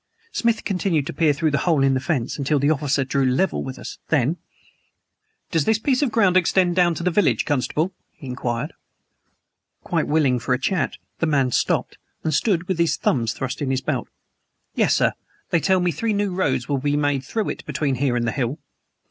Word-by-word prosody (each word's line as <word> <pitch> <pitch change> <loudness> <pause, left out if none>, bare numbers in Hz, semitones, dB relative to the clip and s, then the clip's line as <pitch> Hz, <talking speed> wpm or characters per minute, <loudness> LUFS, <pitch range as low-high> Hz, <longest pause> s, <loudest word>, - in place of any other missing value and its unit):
Smith 230 -2 0
continued 180 -7 0
to - - -5
peer 160 -3 +3
through 155 +2 0
the 140 - +1
hole 160 -6 +2
in 135 0 +4
the 130 - +1
fence, 130 -3 -1
until 145 +2 +1
the 140 +2 +2
officer 145 -2 +1
drew 135 +1 -1
up 125 - 0
level 190 - +1
with 130 0 -6
us. - - -8
Then: 150 +2 +2 1.1
"Does 165 -4 +1
this 220 -1 +3
piece 255 +3 +1
of 280 -5 +1
ground 200 -5 +3
extend 180 0 +3
down 175 -2 +3
to 170 - -5
the 180 - +2
village, 200 0 +2
constable?" 150 +5 0 0.2
he - - -14
inquired. 125 +3 -3 1.1
Quite - - -1
willing 145 -5 +2
for 125 +2 0
a - - -5
chat, 190 -3 -1 0.2
the 165 - +1
man 135 -4 +2
stopped, - - 0 0.2
and 155 - 0
stood 175 +1 +1
with 185 -3 -1
his 170 -1 +2
thumbs 115 -4 0
thrust 135 +2 -4
in 140 - -1
his 130 0 0
belt. - - -2 0.7
"Yes, - - +2
sir. - - +3 0.4
They 170 - +4
tell 190 +3 +2
me 180 -1 +1
three 220 +9 -1
new 200 -2 0
roads 180 -9 0
will 140 -2 0
be 145 +2 0
made 145 -2 +1
through 215 - -2
it - - -5
between 145 -3 -1
here 130 -1 0
and 120 -1 0
the 115 - 0
hill." 130 +1 -2
150 Hz, 210 wpm, -22 LUFS, 135-180 Hz, 1.1 s, in